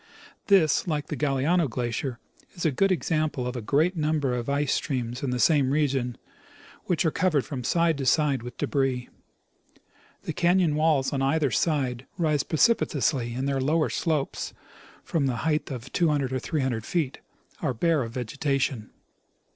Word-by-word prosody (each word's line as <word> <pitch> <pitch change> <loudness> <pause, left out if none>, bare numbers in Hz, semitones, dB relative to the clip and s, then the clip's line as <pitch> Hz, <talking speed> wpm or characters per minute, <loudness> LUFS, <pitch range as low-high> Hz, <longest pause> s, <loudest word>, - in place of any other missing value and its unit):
This, 190 -4 +4
like 150 -3 -2
the - - -2
Galiano 150 +3 +1
glacier, 120 +1 -3 0.4
is 175 - -4
a 160 - +3
good 195 +8 +2
example 155 -7 0
of 125 +1 -3
a 120 - -3
great 155 - +1
number 150 -4 0
of 120 +1 -3
ice 140 0 +1
streams 125 -3 -2
in 140 - -2
the 125 - -1
same 140 0 +3
region 135 -4 0 0.7
which 175 0 0
are 160 - +3
covered 155 -7 +1
from 130 -4 -5
side 165 +2 +2
to 135 - -2
side 145 -2 +2
with 120 0 -9
debris. 135 -3 -1 1.1
The - - -4
canon 175 -2 +3
walls 150 -3 +2
on 135 - -1
either 140 0 +1
side 130 -2 0
rise 155 -5 +2
precipitously, 145 - +1
and 130 +2 -2
their 135 -1 0
lower 155 +4 +2
slopes, 155 -5 -2 0.5
for 165 - -1
the 135 -4 +1
height 155 -1 0
of 125 -4 -7
200 145 -6 +1
or 130 - 0
300 130 -7 -2
feet, 150 -1 -2 0.4
are 140 -6 -1
bare 165 +4 +2
of 115 -2 -4
vegetation. 135 -1 -2
140 Hz, 165 wpm, -26 LUFS, 130-160 Hz, 1.1 s, This